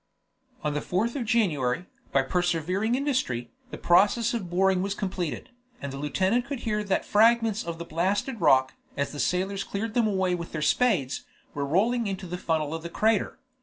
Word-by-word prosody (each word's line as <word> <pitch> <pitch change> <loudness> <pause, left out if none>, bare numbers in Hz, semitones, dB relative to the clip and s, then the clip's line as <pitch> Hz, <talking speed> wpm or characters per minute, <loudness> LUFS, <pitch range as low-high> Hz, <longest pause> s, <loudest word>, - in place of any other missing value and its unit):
On 150 -1 0
the 150 - 0
4th 215 - -1
of 255 -4 -2
January, 175 - +1 0.3
by 135 - +3
persevering 180 - 0
industry, 255 - -1 0.2
the - - -7
process 210 +7 +3
of 205 -7 -3
boring 190 +1 +2
was 195 +1 -2
completed, 185 - -4 0.3
and 140 -1 -6
the - - -5
lieutenant 190 - +1
could 275 -3 -5
hear 210 -2 -1
that 195 -2 0
fragments 225 0 +3
of 170 -1 -5
the 170 - -6
blasted 195 - -1
rock, 130 -4 +4 0.2
as 140 0 -1
the 145 - -7
sailors 195 +4 0
cleared 215 +2 -4
them 235 -2 +2
away 190 -3 +1
with 170 -1 -5
their 155 - -3
spades, 180 - +1 0.3
were 140 -1 -2
rolling 225 - +2
into 195 -1 -4
the 180 0 -5
funnel 160 -3 -1
of 165 - -4
the 170 - -6
crater. 220 +6 +1
185 Hz, 185 wpm, -27 LUFS, 160-220 Hz, 0.3 s, rock